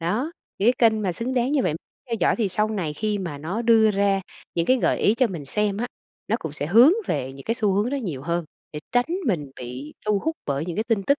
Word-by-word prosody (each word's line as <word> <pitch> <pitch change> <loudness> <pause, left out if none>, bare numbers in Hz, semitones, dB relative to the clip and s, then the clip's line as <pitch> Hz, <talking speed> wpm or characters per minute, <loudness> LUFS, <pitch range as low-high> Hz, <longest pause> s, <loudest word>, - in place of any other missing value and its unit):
Đó, 220 - -1 0.3
những 210 +5 +5
cái 230 -3 +5
kênh 220 -1 -2
mà 185 -3 0
xứng 245 +7 -3
đáng 250 +2 +1
như 280 -4 +3
vậy - - 0 0.3
theo 230 - -2
dõi - - +3
thì 220 -4 +1
sau 210 +4 +1
này 190 -8 -2
khi 210 +6 -1
mà 170 -7 -5
nó 180 +11 -3
đưa 225 -2 +5
ra 200 -1 +2 0.3
những 170 0 0
cái 255 - +5
gợi - - +1
ý 210 - +3
cho 255 +1 +3
mình 175 -9 -6
xem 205 +7 0
á 235 +4 -1 0.4
nó 225 - +2
cũng 160 -9 -5
sẽ 145 -1 -3
hướng 235 - +7
về 130 +1 -2
những 135 0 -11
cái 230 - 0
xu 215 -5 +1
hướng 205 +6 +1
đó 280 - -1
nhiều 175 - -4
hơn 170 +2 -1 0.3
để 150 - -5
tránh 245 +1 +3 0.2
mình 155 - 0
bị 125 +4 -7
thu 210 -1 +3
hút 320 +10 -2
bởi 140 +2 -1
những 175 -1 -4
cái 215 - 0
tin 225 -4 +1
tức 280 +8 +2
205 Hz, 270 wpm, -24 LUFS, 165-230 Hz, 0.4 s, hướng